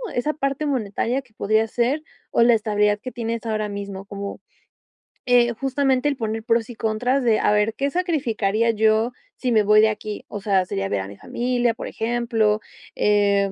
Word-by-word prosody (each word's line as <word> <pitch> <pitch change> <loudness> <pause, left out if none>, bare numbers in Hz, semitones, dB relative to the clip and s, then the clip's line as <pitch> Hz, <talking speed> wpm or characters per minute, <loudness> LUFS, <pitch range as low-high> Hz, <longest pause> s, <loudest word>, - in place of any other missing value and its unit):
esa 270 +5 +1
parte 275 0 -2
monetaria 250 -1 -1
que 240 - -28
podría 220 +1 +1
ser 245 +7 0 0.3
o 235 - +3
la 240 0 +6
estabilidad 210 -1 +2
que 255 +4 -7
tienes 230 -1 -4
ahora 215 -1 -1
mismo? 200 -1 -6
Como, 200 0 -6 0.9
eh, 240 -1 +4
justamente 270 +2 0
el 285 -2 0
poner 220 -2 -3
pros 230 0 +1
y 240 - -8
contras 245 +5 0
de 225 -3 +3
a - - +2
ver, 210 +1 +2
¿qué 275 +4 -1
sacrificaría 235 - 0
yo 220 +1 +2 0.3
si 250 - -1
me 220 -2 +4
voy 210 +1 +6
de 220 - +5
aquí? 215 -1 -5
O 205 - -6
sea, 195 -2 +1
sería 95 - -2
ver 100 0 -1
a 95 - -6
mi 100 0 -11
familia, 245 - 0
por 230 - -7
ejemplo, 225 -2 0 0.3
eh, 200 -1 +2
225 Hz, 185 wpm, -22 LUFS, 210-245 Hz, 0.9 s, la